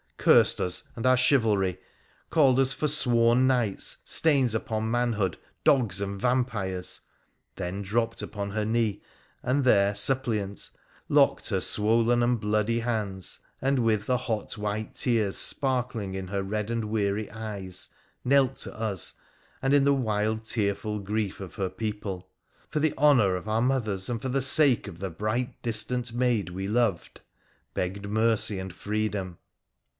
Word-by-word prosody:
Cursed - - +5
us 90 0 +1
and 115 - -5
our 130 0 +5
chivalry, 110 -8 +2 0.5
called 135 -5 +4
us 135 0 +4
forsworn 130 -4 +3
knights, 120 -7 0
stains 140 -7 +3
upon 110 -1 -2
manhood, 115 -6 0 0.3
dogs 115 -8 +3
and 100 0 -4
vampires! 115 -8 -1 0.3
— 65 0 -47
then 95 +1 -4
dropped 115 +3 -1
upon 100 -1 -5
her 105 +1 -1
knee, 110 -2 0 0.4
and 135 +3 0
there 100 -5 +4
suppliant, 105 -3 0 0.4
locked - - +3
her - - 0
swollen 115 +3 +2
and 120 0 +1
bloody 105 +2 0
hands, 105 -6 -3 0.2
and, 135 0 +1
with 110 -3 +1
the 125 +1 +1
hot 115 -5 -4
white 105 +1 -3
tears 110 -5 0
sparkling 125 -7 +1
in 95 -1 -5
her 100 +1 -2
red 105 +2 -3
and 115 -1 -2
weary 105 -1 -1
eyes, 100 -4 -5 0.3
knelt 135 0 +3
to - - -4
us, 105 -6 -2 0.4
and 135 +1 0
in 145 -1 +5
the 140 0 +4
wild 110 -3 -1
tearful 105 -1 -1
grief 105 0 -3
of 95 -5 -9
her 95 -2 -2
people, 100 -2 -5 0.2
' - - -35
for 150 - 0
the 155 0 +1
honour 125 -10 +4
of 90 +3 -6
our 110 +1 +1
mothers, 110 -7 0
and 115 -2 -3
for 130 - -3
the 135 +2 0
sake 135 -3 +4
of 85 -4 -9
the 95 -1 -4
bright 110 +8 -3
distant 120 +1 -1
maid 120 -7 0
we 95 +2 -5
loved,' 110 -5 -1 0.5
begged 100 +3 -3
mercy 110 -1 +1
and 95 -1 -6
freedom. 100 -2 -3
110 Hz, 155 wpm, -27 LUFS, 100-125 Hz, 0.5 s, Cursed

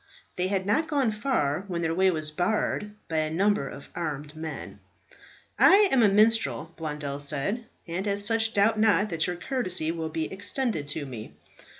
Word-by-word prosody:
They 180 +1 0
had 190 -1 -1
not 220 +11 +1
gone 275 -6 +1
far 200 - -1
when 170 -3 -3
their 165 0 0
way 190 +2 +3
was 155 -3 -2
barred 210 +4 -1
by 160 - -2
a 155 0 +1
number 190 -2 +1
of 140 - -10
armed 150 -3 -5
men. 160 -1 -7 0.8
"I 400 +1 +7
am 265 - +4
a 215 - +6
minstrel," 195 - +2
Blondel 150 -3 -5
said, 150 - -1 0.2
"and 180 +4 -3
as 200 0 +2
such 225 +1 +1
doubt 215 +2 +3
not 210 -2 +3
that 165 -1 +1
your 180 - -2
courtesy 185 - -1
will 165 -1 -4
be 160 +2 -3
extended 205 - -1
to 145 0 -2
me." 120 -5 -8
180 Hz, 180 wpm, -27 LUFS, 155-215 Hz, 0.8 s, I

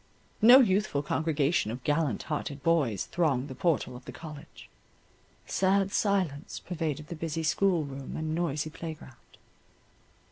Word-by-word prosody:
No 245 +5 +9
youthful 190 - +1
congregation 155 -4 +1
of 125 +3 -6
gallant 145 -6 0
hearted 145 -2 -4
boys 140 - +1
thronged 145 -6 0
the - - -5
portal 140 -4 0
of 125 - -11
the - - -7
college; 155 -1 -11 0.8
sad 195 0 +2
silence 190 -7 0
pervaded 155 -4 -4
the 170 - -5
busy 165 0 -3
school 175 +1 +2
room 135 -1 -7
and 155 0 -2
noisy 155 -2 -1
playground. 155 -6 -10
155 Hz, 135 wpm, -29 LUFS, 140-175 Hz, 0.8 s, No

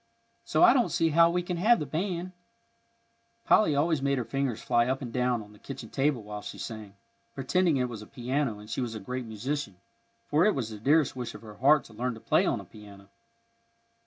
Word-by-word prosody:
So - - +2
I 355 - +8
don't 245 -3 +2
see 165 - +1
how 165 +2 +5
we 175 +1 0
can 175 0 -3
have 225 +7 +4
the 150 - -3
band." 175 +4 -3 1.1
Polly 160 -9 +4
always 155 0 +1
made 140 0 +1
her 125 - -2
fingers 135 -4 -2
fly 120 +1 +2
up 135 +2 -1
and 120 -2 -7
down 125 -2 0
on 105 0 -16
the 105 - -18
kitchen 130 -5 -8
table 135 -4 0
while 105 0 -7
she - - -8
sang, 110 -3 -7 0.4
pretending 160 +4 +1
it 125 -1 0
was 115 -3 -7
a 105 - -11
piano 130 -2 -2
and 105 0 -12
she 115 +4 -3
was 120 -3 -3
a - - -5
great 125 +5 -5
musician, 115 0 -4 0.5
for 150 +3 +3
it 210 - +3
was 115 -4 -3
the 105 - -8
dearest 145 +5 +3
wish 125 -2 -5
of - - -11
her 105 -2 -11
heart 145 +4 +5
to 115 - -15
learn 125 +2 -2
to - - -11
play - - +2
on - - 0
a - - -10
piano. 100 -2 -14
130 Hz, 225 wpm, -28 LUFS, 110-150 Hz, 1.1 s, I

